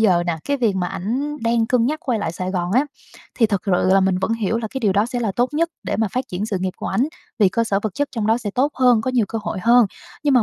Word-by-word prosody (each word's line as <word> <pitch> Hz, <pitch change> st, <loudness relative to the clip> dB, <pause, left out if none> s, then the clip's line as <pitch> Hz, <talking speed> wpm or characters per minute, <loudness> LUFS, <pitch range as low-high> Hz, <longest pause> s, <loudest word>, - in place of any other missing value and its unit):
giờ 185 Hz, -6 st, +4 dB
nà, 170 Hz, -2 st, -1 dB
cái 285 Hz, -, 0 dB
việc 225 Hz, -6 st, +1 dB
mà 180 Hz, -1 st, 0 dB
ảnh 265 Hz, +13 st, -3 dB
đang 230 Hz, 0 st, +1 dB
cân 240 Hz, -1 st, +2 dB
nhắc 305 Hz, +2 st, -2 dB
quay 240 Hz, -4 st, 0 dB
lại 185 Hz, -6 st, -2 dB
Sài 185 Hz, +2 st, -4 dB
Gòn 180 Hz, -1 st, -2 dB
á, 260 Hz, +5 st, +4 dB, 0.5 s
thì 225 Hz, -, +5 dB
thực 200 Hz, -3 st, -1 dB
sự 185 Hz, -4 st, +1 dB
là 195 Hz, -, +5 dB
mình 190 Hz, -1 st, +2 dB
vẫn 190 Hz, +4 st, 0 dB
hiểu 225 Hz, 0 st, -1 dB
là 220 Hz, -2 st, -4 dB
cái 265 Hz, -, -3 dB
điều 205 Hz, -4 st, +2 dB
đó 205 Hz, +3 st, +2 dB
sẽ 245 Hz, 0 st, -3 dB
là 220 Hz, -4 st, -1 dB
tốt 245 Hz, +1 st, +2 dB
nhất 335 Hz, +2 st, +2 dB
để -, -, -2 dB
mà 220 Hz, 0 st, +1 dB
phát 255 Hz, +1 st, -3 dB
triển 190 Hz, +4 st, -3 dB
sự 205 Hz, -4 st, -2 dB
nghiệp 185 Hz, -1 st, -1 dB
của -, -, -5 dB
ảnh, 265 Hz, +6 st, +1 dB, 0.3 s
vì 205 Hz, -4 st, +5 dB
cơ 230 Hz, +5 st, 0 dB
sở 200 Hz, -3 st, +1 dB
vật 215 Hz, -4 st, -3 dB
chất 285 Hz, 0 st, -1 dB
trong 225 Hz, -4 st, -2 dB
đó 225 Hz, +2 st, +3 dB
sẽ 215 Hz, -4 st, -4 dB
tốt 270 Hz, +8 st, +1 dB
hơn, 250 Hz, -3 st, +4 dB
có 255 Hz, +4 st, -1 dB
nhiều 240 Hz, -5 st, +2 dB
cơ 225 Hz, -, -3 dB
hội 190 Hz, -, -3 dB
hơn. 235 Hz, -1 st, +6 dB, 0.4 s
Nhưng 285 Hz, -2 st, +3 dB
mà 245 Hz, -, +5 dB
225 Hz, 310 wpm, -21 LUFS, 195-250 Hz, 0.5 s, hơn